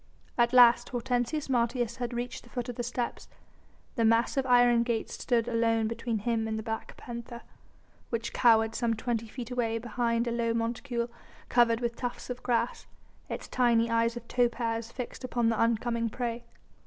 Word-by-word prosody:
At 240 -1 +3
last 240 -1 +6
Hortensius 245 +4 -1
Martius 240 -1 0
had 245 -1 -3
reached 240 +1 -4
the 240 - -17
foot 245 +2 -4
of 245 - -5
the 240 - -3
steps. 240 0 -3 0.7
The 230 - +2
massive 230 +4 +2
iron 245 -1 +5
gates 235 -2 -2
stood 235 -2 0
alone 230 -1 +2
between 230 0 -2
him 225 +1 -1
and 220 0 -2
the 220 - -4
black 225 0 -5
panther, 235 0 -8 0.7
which 230 0 -3
cowered 225 -2 +4
some 230 -1 0
twenty 230 0 -2
feet 240 +1 -7
away 230 -2 0
behind 235 0 0
a 235 - -1
low 230 -1 0
monticule 235 +1 -2 0.4
covered 235 -1 +4
with 235 -1 -1
tufts 245 0 -5
of 250 - -6
grass, 240 -1 -1 0.4
its - - -5
tiny 235 -2 +2
eyes 230 +1 +2
of 235 -1 -9
topaz 235 -2 0
fixed 250 +1 -7
upon 240 -2 +1
the 225 - 0
oncoming 230 0 +1
prey. 235 0 -4
235 Hz, 170 wpm, -29 LUFS, 230-245 Hz, 0.7 s, last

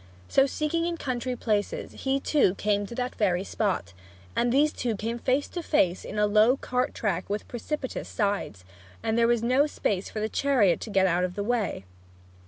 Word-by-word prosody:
So 270 0 +4
seeking 320 +4 -1
in 340 -1 -2
country 255 -3 -2
places, 210 -4 -1
he 270 0 -1
too 275 - +2
came 205 0 0
to 235 - -8
that 250 +1 -2
very 185 -3 +1
spot. 195 - -2 0.4
And 240 0 +2
these 290 +4 +3
two 235 -3 -2
came 230 +3 -3
face 265 +4 +1
to 350 - -4
face 190 - +1
in - - -6
a 210 - +4
low 215 +5 +4
cart 250 -1 -1
track 190 -4 -2
with 205 +1 -3
precipitous 260 +3 -4
sides, 200 - -2 0.4
where 220 - -1
there 230 +1 +3
was 235 -1 +2
no 260 +5 +3
space 200 -9 -2
for - - -8
a - - +1
chariot 220 -9 +2
to - - -6
get 195 -2 +3
out 180 0 +2
of 180 0 -2
the 205 - -2
way! 220 - -1
230 Hz, 195 wpm, -27 LUFS, 200-260 Hz, 0.4 s, So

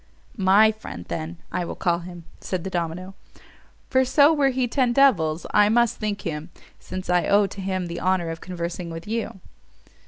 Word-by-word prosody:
"My 200 +2 +5
friend, 210 - -9
then, 160 +2 -4
I 180 - -1
will 170 - -5
call 170 -2 0
him," 175 -1 -10 0.2
said 185 -3 -4
the 190 - -5
domino, 175 +2 -3 0.8
"for 260 0 +4
so, 285 +4 +5
were 285 -3 +3
he 255 -1 0
ten 245 -1 +1
devils, 175 - +3
I 210 0 +5
must 235 +1 +2
think 210 -2 -3
him, 160 0 -5 0.3
since 185 +1 -7
I 180 -1 +2
owe 205 0 +4
to 195 0 -7
him 185 -1 -2
the 170 0 -5
honour 185 -3 +1
of 165 - -7
conversing 175 -1 -5
with 165 0 -7
you. 215 -3 -4
185 Hz, 185 wpm, -24 LUFS, 170-220 Hz, 0.8 s, My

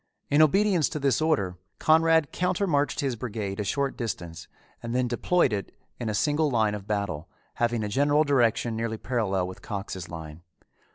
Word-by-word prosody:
In 145 +2 +5
obedience 185 0 +4
to 155 - -4
this 135 -1 +1
order 100 - 0 0.2
Conrad 160 -1 +4
counter 180 +2 0
marched 145 -5 +1
his 135 -3 -1
brigade 110 -4 -4
a - - 0
short 140 +6 -1
distance 85 -8 -5 0.3
and 115 +1 -4
then 125 0 +2
deployed 125 +2 +2
it 100 -2 -4 0.2
in 115 - -2
a 105 - -1
single 150 +4 +2
line 110 -5 +2
of 105 -1 -6
battle, 100 -6 -2 0.3
having 120 -2 +1
a - - -1
general 145 +7 +3
direction 120 -5 +2
nearly 110 0 -2
parallel 100 -7 -1
with 95 - -9
Cox's 95 -4 -5
line. 80 -1 -8
120 Hz, 175 wpm, -26 LUFS, 100-145 Hz, 0.3 s, In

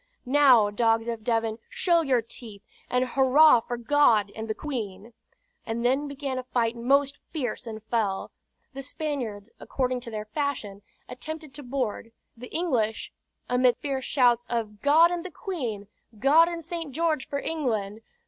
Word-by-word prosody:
Now, 255 -6 +5
dogs 225 +1 +2
of 230 -2 -4
Devon, 225 -1 0
show 340 -2 +2
your 260 -6 +1
teeth, 220 -3 -11 0.3
and 250 +1 +1
hurrah 265 +2 +5
for 240 +1 -5
God 235 -5 +3
and 220 0 -5
the 220 - -2
Queen!" 225 -6 -6 0.5
And 235 +1 -3
then 270 +4 +2
began 275 -2 -4
a - - -5
fight 240 -2 0
most 275 +4 +1
fierce 250 -5 -4
and 220 -1 -7
fell; 220 -4 -1 0.4
the 275 - -6
Spaniards, 255 -7 -5
according 255 -1 -2
to 240 - -9
their 215 -1 -5
fashion, 215 -5 -3 0.3
attempted 310 +2 -8
to 290 - -9
board, 245 -4 -3 0.2
the 245 +2 -10
English, 245 -11 -1 0.4
amid 250 0 +3
fierce 270 -3 -3
shouts 245 -3 +3
of 215 -3 -3
"God 320 +4 +5
and 350 -1 -3
the 370 - -6
Queen!" 255 - -5 0.3
"God 295 +8 +5
and 340 -1 -4
St. 335 -3 -5
George 315 -2 0
for 280 - -3
England!" 225 -10 -2
250 Hz, 160 wpm, -26 LUFS, 225-290 Hz, 0.5 s, Now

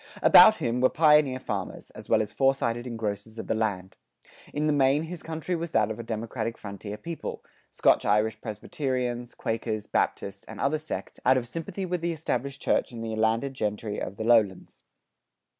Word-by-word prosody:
About 220 - +9
him 120 0 -1
were 130 - +5
pioneer 150 -5 +4
farmers, 130 - -5
as - - -12
well 110 - +4
as 105 - -8
foresighted 130 -3 +1
engrossers 110 -2 -4
of - - -5
the - - 0
land. 100 -4 -2 0.5
In 150 +1 -1
the 155 - +3
main 140 +2 +3
his 170 +1 -7
country 165 +2 -3
was 170 -1 -5
that 110 0 +3
of 110 - -6
a - - -4
democratic 115 +1 -4
frontier 100 0 -7
people 165 +9 -6 0.3
Scotch - - +3
Irish 105 +1 +1
Presbyterians, 120 +2 -3
Quakers, 110 -2 -3
Baptists, 100 0 -1
and - - -10
other 145 +3 +1
sects,[94:1] 155 - -6
out 130 - +6
of 120 -2 -2
sympathy 165 +8 -5
with 180 -1 -2
the 170 0 -1
established 140 -3 -3
church - - +1
and 115 -1 -7
the 110 -1 -3
landed 115 +5 +1
gentry 105 -3 -3
of 95 - -4
the - - -3
lowlands. 110 -5 +2
120 Hz, 180 wpm, -27 LUFS, 110-145 Hz, 0.5 s, About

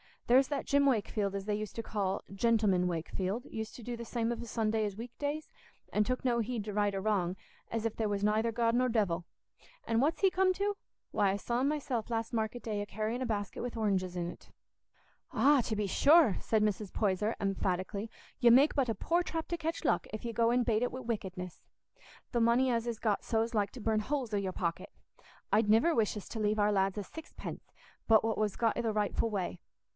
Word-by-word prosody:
There's 260 +2 +5
that 285 -2 -2
Jim 280 0 +3
Wakefield, 210 -5 0
as 195 - -3
they 210 - -1
used 210 0 -4
to 230 - -3
call 200 -3 -2
'Gentleman 200 -4 +2
Wakefield,' 185 +6 -3
used 220 -1 -6
to 240 - -10
do 240 +2 -4
the 235 0 -7
same 230 0 -1
of 240 - -4
a - - -6
Sunday 220 -1 0
as 205 -2 -4
o' - - -17
weekdays, 285 +6 -4 0.4
and 210 0 +2
took 255 +2 -2
no 240 -2 +2
heed 230 -1 -2
to 210 0 -5
right 205 -1 +1
or 195 - -2
wrong, 190 -4 0 0.3
as 230 -1 -2
if 225 - -2
there 220 - 0
was 200 0 -1
nayther 215 +2 +2
God 230 0 +1
nor 250 +1 +3
devil. 190 -7 0 0.6
An' 230 0 +1
what's 295 +6 +1
he 385 -1 +5
come 370 0 +3
to? 405 +2 -1 0.3
Why, 200 -2 +2
I - - 0
saw 235 +4 -1
him 270 - +2
myself 270 -7 -2
last 230 0 -2
market 225 +1 -2
day 210 -2 -2
a - - -3
carrying 215 +4 -3
a - - 0
basket 205 -4 -3
wi' 245 - -2
oranges 190 -4 0
in't." 175 -1 -5 0.8
"Ah, 285 -1 +5
to 220 - -1
be 210 0 0
sure," 285 - +5
said 220 -2 +1
Mrs. 210 -1 -1
Poyser, 210 +1 0
emphatically, 195 +2 -1 0.3
"you 240 -1 +6
make 270 +5 +6
but 270 -4 +1
a 225 - 0
poor 345 +1 +1
trap 325 -2 -4
to 345 - -1
catch 330 0 -3
luck - - +1
if 215 - -5
you 235 - -3
go 230 +1 +2
and 245 0 +2
bait 220 -2 +2
it 245 - -1
wi' 255 - -5
wickedness. 190 -6 -5 0.7
The 235 - +1
money 240 +3 +4
as 230 0 0
is 235 -2 -2
got 210 -3 0
so's 225 +1 0
like 205 -2 +1
to 250 - -9
burn 220 0 +1
holes 250 0 -2
i' - - +2
your 190 -2 -2
pocket. 170 -2 -3 0.6
I'd 210 +1 +3
niver 230 +11 +5
wish 220 -5 +1
us 205 - -8
to 225 - -5
leave 210 0 +1
our 210 0 +3
lads 195 0 +1
a 205 - -2
sixpence 320 - -9 0.4
but 220 -1 +6
what 225 0 0
was 215 -2 0
got 230 -1 +1
i' - - +1
the 225 -2 -1
rightful 210 +2 0
way. 185 -4 -3
220 Hz, 230 wpm, -32 LUFS, 205-245 Hz, 0.8 s, you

